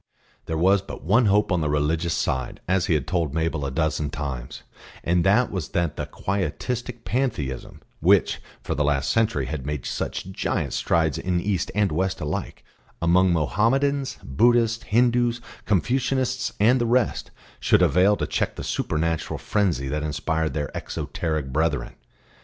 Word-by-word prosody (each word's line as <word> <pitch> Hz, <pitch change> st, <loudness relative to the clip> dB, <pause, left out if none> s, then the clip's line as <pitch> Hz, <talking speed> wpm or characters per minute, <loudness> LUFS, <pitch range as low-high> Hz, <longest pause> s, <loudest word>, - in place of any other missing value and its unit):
There 80 Hz, -, -2 dB
was 95 Hz, +4 st, +4 dB
but 100 Hz, -, -9 dB
one 110 Hz, +7 st, +4 dB
hope 105 Hz, +1 st, +3 dB
on 90 Hz, -2 st, +2 dB
the 75 Hz, -, 0 dB
religious 80 Hz, +3 st, 0 dB
side, 65 Hz, -1 st, -2 dB
as 95 Hz, 0 st, +1 dB
he 80 Hz, -, +3 dB
had 75 Hz, -, -1 dB
told 85 Hz, -6 st, -1 dB
Mabel 80 Hz, -3 st, -1 dB
a -, -, -2 dB
dozen 75 Hz, +1 st, -1 dB
times, 65 Hz, -5 st, -5 dB, 0.4 s
and 85 Hz, 0 st, +2 dB
that 105 Hz, +6 st, +3 dB
was 90 Hz, -6 st, -3 dB
that 85 Hz, -3 st, 0 dB
the -, -, -4 dB
Quietistic 115 Hz, -, -3 dB
Pantheism 75 Hz, -, -2 dB, 0.2 s
which -, -, +3 dB, 0.2 s
for -, -, -2 dB
the 75 Hz, -, 0 dB
last 70 Hz, -1 st, +1 dB
century 110 Hz, -, +1 dB
had 70 Hz, 0 st, -4 dB
made 75 Hz, -1 st, -4 dB
such 95 Hz, -, -4 dB
giant -, -, -2 dB
strides 80 Hz, -4 st, +1 dB
in 90 Hz, -1 st, 0 dB
East 95 Hz, -2 st, -1 dB
and 105 Hz, -2 st, +2 dB
West 95 Hz, +4 st, -1 dB
alike, -, -, -4 dB, 0.3 s
among 90 Hz, +2 st, +4 dB
Mohammedans, 130 Hz, -, +1 dB
Buddhists, 115 Hz, -, +3 dB
Hindus, 120 Hz, +1 st, +2 dB, 0.3 s
Confucianists 125 Hz, +5 st, +1 dB
and 120 Hz, +5 st, +4 dB
the 120 Hz, -, +1 dB
rest, 120 Hz, -1 st, +1 dB, 0.3 s
should -, -, +4 dB
avail 95 Hz, +3 st, +4 dB
to -, -, -1 dB
check -, -, -1 dB
the -, -, -6 dB
supernatural 80 Hz, +1 st, -1 dB
frenzy 90 Hz, -, 0 dB
that 75 Hz, +3 st, -2 dB
inspired 80 Hz, +1 st, -1 dB
their 75 Hz, -2 st, -2 dB
exoteric 80 Hz, -5 st, -3 dB
brethren. 75 Hz, -5 st, 0 dB
85 Hz, 160 wpm, -24 LUFS, 75-110 Hz, 0.4 s, was